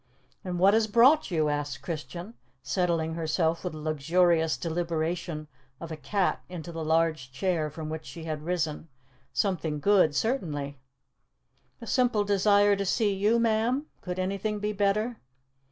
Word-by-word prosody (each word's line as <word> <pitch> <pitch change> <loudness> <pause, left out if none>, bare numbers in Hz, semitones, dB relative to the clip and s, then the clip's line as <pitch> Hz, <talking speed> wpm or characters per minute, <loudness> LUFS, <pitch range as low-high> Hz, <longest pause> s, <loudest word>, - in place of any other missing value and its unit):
"And 180 -1 -3
what 195 +3 +5
has 220 0 +3
brought 245 +8 +5
you?" 160 -4 +1
asked 145 -2 -3
Christian, 170 +6 -6 0.3
settling 170 -3 0
herself 165 0 0
with 180 -3 -3
the 155 - -7
luxurious 160 +1 +2
deliberation 165 0 -2 0.3
of 165 -1 -7
a - - -3
cat 190 +5 -1
into 175 -1 -7
the 165 -1 -5
large 160 -4 +1
chair 160 +2 -1
from 155 +1 -7
which 160 0 -6
she 165 - -8
had 155 -2 -4
risen. 160 -2 -2 0.4
"Something 165 -6 -1
good, 185 -4 +4
certainly." 145 - -2 1.0
"The - - -9
simple 245 -5 +2
desire 205 0 +4
to 200 - -1
see 205 +1 +1
you, 205 +4 +2
ma'am. 230 +5 +1 0.2
Could 180 -1 -5
anything 200 +3 -1
be 210 +1 -2
better?" 210 +3 0
175 Hz, 150 wpm, -28 LUFS, 155-205 Hz, 1.0 s, what